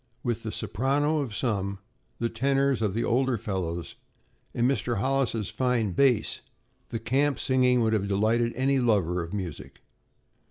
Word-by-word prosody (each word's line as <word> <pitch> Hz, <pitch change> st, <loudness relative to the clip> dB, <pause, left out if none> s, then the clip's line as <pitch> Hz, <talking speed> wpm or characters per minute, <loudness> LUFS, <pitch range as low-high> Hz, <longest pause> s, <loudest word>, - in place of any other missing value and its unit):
With 120 Hz, -2 st, -1 dB
the 110 Hz, -, -4 dB
soprano 145 Hz, +9 st, 0 dB
of 125 Hz, -7 st, -3 dB
some, 100 Hz, -5 st, -1 dB, 0.4 s
the 115 Hz, -, 0 dB
tenors 135 Hz, +2 st, +1 dB
of 105 Hz, -3 st, 0 dB
the 115 Hz, -, 0 dB
older 130 Hz, +1 st, +1 dB
fellows 90 Hz, -5 st, -4 dB, 0.6 s
and 120 Hz, +1 st, +1 dB
Mr. 120 Hz, -3 st, 0 dB
Hollis' 125 Hz, -3 st, 0 dB
fine 125 Hz, -5 st, 0 dB
bass, 125 Hz, +3 st, +2 dB, 0.5 s
the -, -, -3 dB
camp 135 Hz, +6 st, +1 dB
singing 125 Hz, -1 st, +3 dB
would 110 Hz, -1 st, +2 dB
have 100 Hz, -2 st, 0 dB
delighted 110 Hz, +4 st, +2 dB
any 135 Hz, +1 st, +2 dB
lover 95 Hz, -8 st, +1 dB
of 85 Hz, 0 st, -6 dB
music. 80 Hz, -9 st, -6 dB
115 Hz, 150 wpm, -27 LUFS, 100-130 Hz, 0.6 s, singing